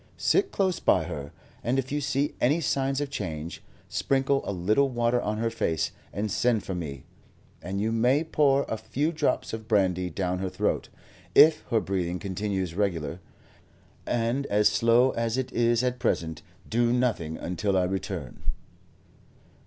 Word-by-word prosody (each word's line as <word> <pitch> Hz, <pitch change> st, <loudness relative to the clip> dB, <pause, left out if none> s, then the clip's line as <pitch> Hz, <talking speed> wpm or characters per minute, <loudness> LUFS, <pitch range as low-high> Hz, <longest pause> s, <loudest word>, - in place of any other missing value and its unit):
Sit 390 Hz, -, +2 dB
close 190 Hz, -2 st, 0 dB
by -, -, +3 dB
her, 70 Hz, +1 st, -6 dB, 0.3 s
and 125 Hz, +3 st, +1 dB
if 135 Hz, 0 st, -2 dB
you 145 Hz, 0 st, 0 dB
see 140 Hz, +1 st, 0 dB
any 145 Hz, +7 st, +3 dB
signs 135 Hz, -2 st, 0 dB
of 145 Hz, -1 st, -3 dB
change, 80 Hz, -4 st, -5 dB, 0.3 s
sprinkle 135 Hz, 0 st, +1 dB
a -, -, -2 dB
little 105 Hz, +9 st, +2 dB
water 120 Hz, 0 st, +1 dB
on 105 Hz, 0 st, -2 dB
her 115 Hz, +1 st, 0 dB
face 80 Hz, -8 st, -1 dB, 0.2 s
and 105 Hz, +2 st, -2 dB
send 120 Hz, -5 st, +2 dB
for 95 Hz, -, -4 dB
me; 75 Hz, -7 st, -5 dB, 0.6 s
and 95 Hz, +2 st, -4 dB
you 110 Hz, +2 st, 0 dB
may 125 Hz, +7 st, +3 dB
pour 145 Hz, -3 st, +3 dB
a 110 Hz, -, -3 dB
few 145 Hz, +8 st, -1 dB
drops 155 Hz, -, -1 dB
of 110 Hz, -1 st, -6 dB
brandy 90 Hz, -4 st, +2 dB
down 90 Hz, +1 st, -2 dB
her 95 Hz, 0 st, -2 dB
throat. -, -, -1 dB, 0.5 s
If 155 Hz, 0 st, +7 dB
her 115 Hz, -, +3 dB
breathing 90 Hz, -3 st, -2 dB
continues 95 Hz, -2 st, -3 dB
regular, 90 Hz, -4 st, -1 dB, 0.9 s
and 120 Hz, +4 st, 0 dB
as 105 Hz, +1 st, +4 dB
slow 120 Hz, +3 st, +4 dB
as 115 Hz, +1 st, -1 dB
it 130 Hz, -1 st, -2 dB
is 120 Hz, 0 st, +2 dB
at 125 Hz, 0 st, -1 dB
present, 80 Hz, -9 st, -1 dB, 0.3 s
do 120 Hz, +1 st, +2 dB
nothing 115 Hz, -11 st, 0 dB
until 90 Hz, +3 st, -1 dB
I 90 Hz, -, +3 dB
return." 95 Hz, +1 st, -4 dB
115 Hz, 160 wpm, -27 LUFS, 95-130 Hz, 0.9 s, If